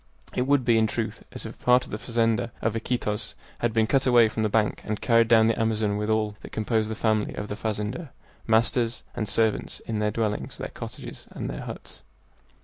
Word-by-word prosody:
It 125 +1 0
would 140 -3 +3
be, 115 -2 +5
in 110 - +3
truth, 110 +1 -3
as - - -6
if - - -6
a - - -24
part 125 +1 +5
of - - -13
the 105 - -3
fazenda 115 -1 0
of 115 - 0
Iquitos 110 -2 -2 0.2
had 120 - +1
been 110 0 +3
cut 135 +3 +2
away 120 -3 +6
from 110 - -3
the 110 - +2
bank 105 0 +1
and 105 -1 -3
carried 115 -1 +4
down 115 -1 +6
the 115 0 +1
Amazon 110 -2 +1
with 105 +1 -2
all 110 -1 +1
that - - -10
composed 110 0 0
the 110 - -3
family 110 -1 0
of 105 - -5
the 105 - -3
fazender 110 +8 -3 0.4
masters 115 +1 +2
and 110 - -3
servants, 110 -2 0
in 110 -2 -3
their 105 0 +1
dwellings, 105 -1 -2
their - - -5
cottages, - - -9
and - - -5
their - - -5
huts. - - -9
110 Hz, 220 wpm, -26 LUFS, 105-115 Hz, 0.4 s, away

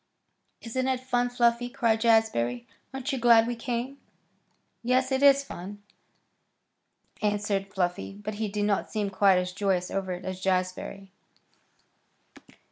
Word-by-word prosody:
"Isn't 255 +3 -2
it 260 -1 0
fun, 245 -1 0
Fluffy?" 245 0 +1
cried 230 -4 +1
Jazbury. 220 - +2 0.3
"Aren't 270 +2 -4
you 265 - -2
glad 230 -1 +6
we 240 +1 -2
came?" 245 +3 -4 0.8
"Yes, 255 +2 +1
it 265 0 +1
is 280 0 +6
fun," 205 -4 -9 1.4
answered 205 -2 -1
Fluffy; 180 -1 -2
but 210 +2 -6
he 220 - 0
did 205 0 -2
not 205 -1 0
seem 205 -2 -2
quite 190 -1 +4
as 180 0 -1
joyous 185 -2 -1
over 195 -1 -2
it 180 +1 -8
as 185 0 -5
Jazbury. 185 +1 -2
215 Hz, 135 wpm, -27 LUFS, 195-245 Hz, 1.4 s, glad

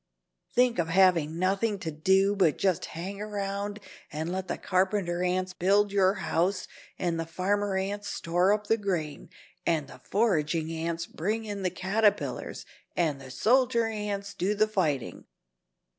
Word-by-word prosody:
Think 245 -4 +3
of 165 - +1
having 170 -3 +4
nothing 195 +4 +1
to 175 -5 -4
do 190 +6 +3
but 180 -6 +3
just 190 -4 +1
hang 195 +4 -5
around 205 0 -3 0.3
and 160 +3 -3
let 190 0 -3
the - - -2
carpenter 185 -2 0
ants 185 +1 0
build 200 +3 +3
your 195 -1 +3
house 185 +1 0 0.3
and 170 -2 -1
the 165 - -2
farmer 195 +3 0
ants 205 +2 -3
store 175 +3 +1
up 210 0 +1
the 225 +2 +2
grain 175 -8 -3 0.3
and 155 -4 0
the - - -13
foraging 165 -7 +1
ants 165 +1 -2
bring 215 +9 -2
in 205 -2 -4
the 185 - +1
caterpillars 200 +4 0 0.3
and 155 -5 +1
the 130 - -10
soldier 240 - +3
ants 210 -2 -3
do 200 +3 0
the 215 +1 +3
fighting." 150 - -1
190 Hz, 155 wpm, -28 LUFS, 170-205 Hz, 0.3 s, having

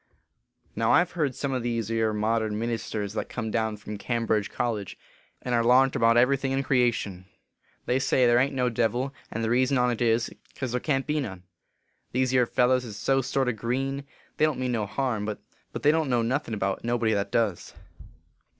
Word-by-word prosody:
" - - -42
Now, - - +2
I - - +6
ve 180 - -12
heerd 150 -7 -1
some 140 -1 -2
o 130 - 0
these 115 -2 -2
ere 110 -1 +1
modern 110 0 0
min 115 +2 -2
isters 105 -2 -3
that 110 - -3
come 110 -3 -4
down 110 -2 -1
from 105 0 -8
Cambridge 115 -3 0
college, 110 -6 -3 0.5
and 125 - -2
are 120 - +3
larnt 130 +3 +4
about 115 0 +4
every 125 +3 +4
thing 135 0 -2
in 135 +1 0
creation, 120 -8 0 0.6
they 125 +2 +1
say 130 -1 +3
there 120 0 +5
ain 135 +2 +3
t - - -9
no 125 -1 +1
devil, 120 +3 0 0.2
and 115 - -4
the 110 - 0
reason 130 +2 +3
on 125 -1 +2
t 120 +1 0
is, 115 +1 +1 0.2
cause 130 -3 -4
there 125 - 0
can 135 -3 0
t 150 - -2
be 155 - +1
none. 95 -10 -5 0.7
These 130 0 +1
ere 125 -2 +4
fellers 125 +2 +2
is 110 -4 -8
so 135 +6 +2
sort 135 +1 0
o - - +3
green! 135 +5 -2 0.3
they 155 - +4
don 155 -2 0
t - - -6
mean 125 -1 0
no 110 -4 -1
harm, 120 -2 -1
but 105 0 -3 0.5
they 150 - +6
don 160 0 +1
t - - -5
know 120 -2 +2
nothin 125 -1 -1
about 95 -1 -2
nobody 115 -2 +1
that 100 -1 -1
does. 110 -6 -1
120 Hz, 225 wpm, -26 LUFS, 110-130 Hz, 0.7 s, I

